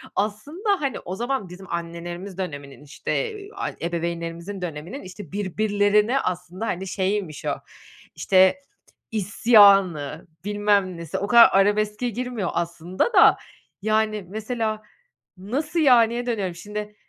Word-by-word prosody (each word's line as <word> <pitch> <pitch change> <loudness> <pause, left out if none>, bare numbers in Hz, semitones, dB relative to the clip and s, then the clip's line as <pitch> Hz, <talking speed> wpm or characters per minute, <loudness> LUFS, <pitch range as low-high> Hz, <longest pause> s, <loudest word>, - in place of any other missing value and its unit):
Aslında, 300 - -1
hani, 275 -2 -2
o 185 - -6
zaman 240 -2 -2
bizim 180 +2 -11
annelerimiz 175 +3 -6
döneminin, 145 -6 -6
işte, 140 - -6 0.3
eee, 400 0 -11
ay 400 - -4
ebeveynlerimizin 170 +2 -4
döneminin, 175 - -6
işte, 185 -2 -10
birbirlerine 205 +4 +1
aslında, 180 +1 -4
hani, 190 0 -3
şeyiymiş 190 -5 -2
o, - - 0 0.6
işte, 190 +8 +4 0.5
isyanı, 200 - +4 0.2
bilmem 205 -3 +1
nesi, 170 -2 -5
o 200 - -2
kadar 235 +2 +8
arabeske 210 +4 +2
girmiyor 240 -4 -3
aslında 170 - -2
da, - - +7 0.4
yani, 215 -1 0
mesela 220 +1 -3 0.6
"Nasıl, 285 - -2
yani?"ye 240 -4 +4
dönüyorum, 200 -7 -2
şimdi, 210 +3 -7
205 Hz, 120 wpm, -24 LUFS, 180-220 Hz, 0.6 s, kadar